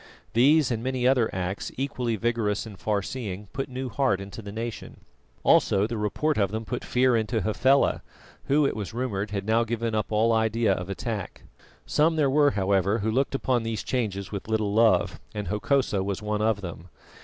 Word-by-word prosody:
These 140 +4 +4
and 115 -2 -1
many 130 0 0
other 130 -4 +3
acts, 90 +1 -3
equally 125 -3 -1
vigorous 110 -1 -1
and 110 -2 -9
far 105 -2 0
seeing, 105 -6 -6
put 135 - -3
new 130 +1 -4
heart 125 -6 +1
into 100 +3 -8
the 100 -1 -8
nation. 115 +1 -6 0.4
Also 100 +1 +4
the 115 +2 -3
report 110 +7 0
of 100 -2 +2
them 110 +2 -4
put 125 +3 -4
fear 125 0 +2
into 110 0 0
Hafela, 130 +8 +2 0.4
who, 145 +1 +3
it - - 0
was 110 0 -5
rumoured, 110 -5 -2
had 100 -1 -3
now 110 +2 +3
given 115 0 -2
up 110 0 -1
all 110 +2 +3
idea 110 -1 +2
of 90 0 -5
attack. 100 0 -5 0.4
Some 160 +2 +2
there 145 -4 +2
were, 145 +1 +5
however, 100 -2 +1
who 110 0 -1
looked 135 +3 0
upon 130 -3 +1
these 115 -1 -3
changes 100 -6 -2
with 100 -1 -5
little 110 -2 0
love, 110 +1 +3 0.2
and 105 -4 -4
Hokosa 105 0 +1
was 100 -1 -2
one 105 0 -2
of 110 -2 +1
them. 85 -1 -8
110 Hz, 190 wpm, -26 LUFS, 100-125 Hz, 0.4 s, were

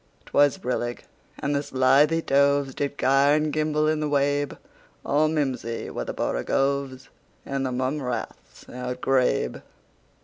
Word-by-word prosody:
'T - - -17
was 145 -3 +4
brillig, 120 -1 -3 0.3
and 145 +1 -1
the 140 - +1
slithy 145 +4 +3
tovesDid 140 0 +1
gyre 135 +2 +4
and 155 -1 0
gimble 155 0 +1
in 155 0 +1
the 150 -1 -1
wabe; 145 0 0 0.5
All 150 +2 +2
mimsy 130 -7 -2
were - - -4
the - - -4
borogoves, 135 - -1 0.4
And 135 0 -2
the 130 - -2
mome 130 +4 -1
raths 125 -2 -6
outgrabe. 125 +1 -1
140 Hz, 135 wpm, -25 LUFS, 130-145 Hz, 0.5 s, was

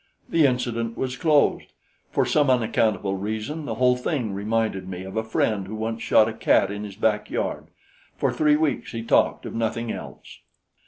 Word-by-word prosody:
The 160 -4 +4
incident 120 -2 -2
was 130 -1 -2
closed. 150 -1 +2 0.4
For - - +1
some 145 -2 +2
unaccountable 110 -5 +1
reason 110 +10 -4
the - - -3
whole 125 0 +3
thing 125 -4 -2
reminded 100 -2 -1
me 90 0 -6
of 95 +2 -8
a 110 - 0
friend 110 -3 0
who 110 - -6
once 110 +1 -3
shot 110 - +4
a 115 - -3
cat 100 -2 +2
in 105 +1 -5
his 100 -2 -8
backyard. 105 0 -1 0.5
For - - 0
three 150 -1 +3
weeks 150 -4 -1
he 115 -1 -4
talked - - +2
of - - -6
nothing 115 0 -2
else. - - -9
115 Hz, 175 wpm, -24 LUFS, 105-125 Hz, 0.5 s, The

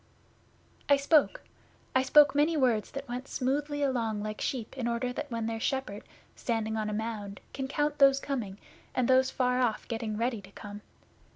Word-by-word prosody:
'I 285 - +7
spoke. 305 - +3 0.5
I 260 - +5
spoke 285 +1 +6
many 300 +3 +2
words 240 -6 +2
that 275 0 -7
went 250 +2 -5
smoothly 290 +3 -1
along 230 -6 0
like 215 0 -5
sheep 245 -3 -3
in 250 -3 -2
order 240 +1 -1 0.2
when 230 -2 -2
their 225 0 -2
shepherd, 265 -4 -2 0.3
standing 220 -2 -2
on 215 -1 -1
a - - -3
mound, 210 -2 -4
can 270 -1 -3
count 295 +1 -1
those 275 -1 +6
coming, 235 -9 -4 0.4
and 250 -2 +2
those 260 0 +4
far 250 -1 +1
off 230 -4 0
getting 225 -2 -3
ready 230 -1 -1
to 190 - -14
come. 205 -1 -9
250 Hz, 175 wpm, -29 LUFS, 220-275 Hz, 0.5 s, I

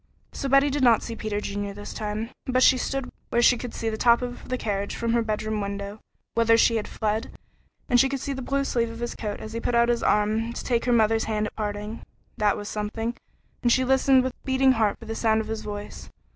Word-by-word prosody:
So 275 - -4
Betty 275 +1 +5
did 285 +1 -1
not 235 -4 +5
see 230 - -5
Peter 215 -2 -3
Junior 200 -1 -4
this 205 0 -7
time, 215 +2 -4 0.2
but 255 0 +3
she - - +7
stood 270 +1 -3 0.2
where 235 - +1
she 245 - +6
could 245 0 -6
see 225 - -4
the 220 -1 -1
top 235 0 +4
of 245 0 -7
the 255 - -1
carriage 200 -3 -2
from 230 0 -1
her 235 - +3
bedroom 215 -1 -2
window, 200 +1 -5 0.3
whither 230 0 +4
she 230 0 +4
had 215 - -3
fled, 215 0 -2 0.6
and 245 -3 +4
she 270 - +4
could 275 0 -2
see 275 +2 -3
the 265 - -5
blue 275 +2 0
sleeve 235 -4 0
of 230 - -8
his 240 0 -3
coat 210 -2 -5
as 220 - -8
he 230 - -2
put 235 - -1
out 235 0 +4
his 240 -1 +1
arm 215 +2 +1
to - - -6
take 235 -2 0
her 250 - +2
mother's 225 -1 +3
hand 215 -1 -1
at - - -6
parting. 210 +1 -4 0.4
That 210 -1 +2
was 205 - -6
something, 220 +3 -3 0.5
and 240 - +2
she 260 +2 +3
listened 265 0 +4
with 260 -1 -2
beating 265 0 +3
heart 220 -5 +1
for 230 - -12
the 225 - -4
sound 220 -1 +2
of 220 - -4
his 220 -1 -3
voice. 205 0 -7
230 Hz, 245 wpm, -25 LUFS, 215-250 Hz, 0.6 s, she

